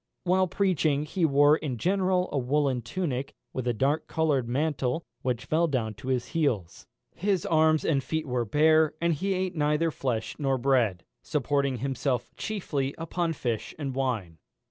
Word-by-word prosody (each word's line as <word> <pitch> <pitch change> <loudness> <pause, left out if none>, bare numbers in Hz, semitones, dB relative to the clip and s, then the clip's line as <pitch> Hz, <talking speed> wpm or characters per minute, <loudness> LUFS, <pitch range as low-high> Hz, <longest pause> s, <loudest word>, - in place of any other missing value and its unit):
While 185 +1 +3
preaching, 160 -7 +1
he 170 +2 0
wore 145 +1 +5
in 135 -7 -4
general 185 - +1
a 145 - -1
woollen 135 0 +1
tunic, 135 +1 -3 0.2
with 130 -1 -3
a - - +3
dark 140 +7 0
coloured 145 -7 0
mantle, 140 +1 -1 0.2
which 125 -1 -2
fell 160 +4 +2
down 120 -7 -1
to 105 +5 -11
his 125 -2 -1
heels. 125 - -1 0.3
His 190 -1 0
arms 155 -1 +3
and 140 -4 +1
feet 160 +4 -2
were 125 -3 -1
bare; 155 +7 +3
and 170 0 +2
he 190 +6 -1
ate 185 0 -1
neither 150 +2 +1
flesh 120 -6 -2
nor 135 -2 +1
bread, 120 -9 +1 0.2
supporting 140 -2 0
himself 130 0 -2
chiefly 145 -10 -3
upon 165 0 -2
fish 120 -7 -3
and 140 -3 -3
wine. 115 -11 -2
145 Hz, 165 wpm, -27 LUFS, 125-160 Hz, 0.3 s, wore